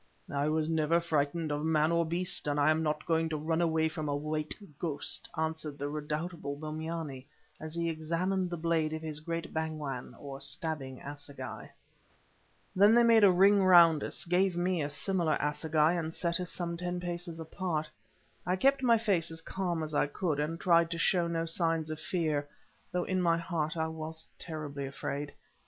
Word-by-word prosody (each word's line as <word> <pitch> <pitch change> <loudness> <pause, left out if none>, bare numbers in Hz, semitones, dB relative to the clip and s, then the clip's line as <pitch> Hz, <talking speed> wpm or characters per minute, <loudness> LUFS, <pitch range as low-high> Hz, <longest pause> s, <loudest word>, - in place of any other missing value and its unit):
"I 140 +1 +1
never 155 +1 +1
was 170 0 +2
frightened 155 0 0
of 145 0 -1
man 155 0 +3
or 170 -1 +2
beast, 175 0 -1
and 145 0 +1
I 145 +2 +5
am 155 +1 +1
not 150 -1 -1
going 165 -1 +1
to 155 - -1
run 160 +2 0
away 160 -1 +2
from 155 -1 -4
a 145 - 0
White 155 +1 -2 0.2
Ghost," 155 -5 -3
answered 160 -2 -2
the 145 0 -3
redoubtable 150 0 -3
Bombyane, 155 -2 -5 0.4
as 155 +1 -6
he 170 0 0
examined 170 +4 -1
the 175 - -3
blade 160 -1 +1
of 160 0 -4
his 155 -2 -4
great 165 +2 -4
bangwan 155 -5 -3
or 140 -1 -8
stabbing 140 -2 -4
assegai. 145 -2 -8 1.1
Then 205 +4 +7
they 240 - +6
made 230 -2 +6
a 200 - +9
ring 195 +2 +5
round 170 -4 +7
us, - - -3
gave 180 +1 +2
me 175 -1 +1
a 145 - -1
similar 170 +1 0
assegai, 150 +2 +2
and 160 -2 -2
set 170 0 0
us 180 -2 -3
some 170 -1 -3
ten 180 0 -3
paces 175 -1 -4
apart. 160 -1 -2 0.6
I 180 - +1
kept 275 +7 +3
my 235 -3 +5
face 195 -7 +1
as 165 0 -7
calm 175 -2 -2
as 155 0 -5
I 145 - +2
could, 150 0 -1
and 160 +3 -2
tried 170 -2 +4
to 170 - -3
show 175 0 +3
no 165 -1 -1
signs 165 -1 0
of 155 - -5
fear, 155 -5 -1 0.4
though 180 0 0
in 185 0 0
my 170 -1 +3
heart 165 -2 -2
I 160 0 0
was 160 0 -5
terribly 145 -4 -5
afraid. 140 +1 -4
160 Hz, 185 wpm, -31 LUFS, 150-170 Hz, 1.1 s, a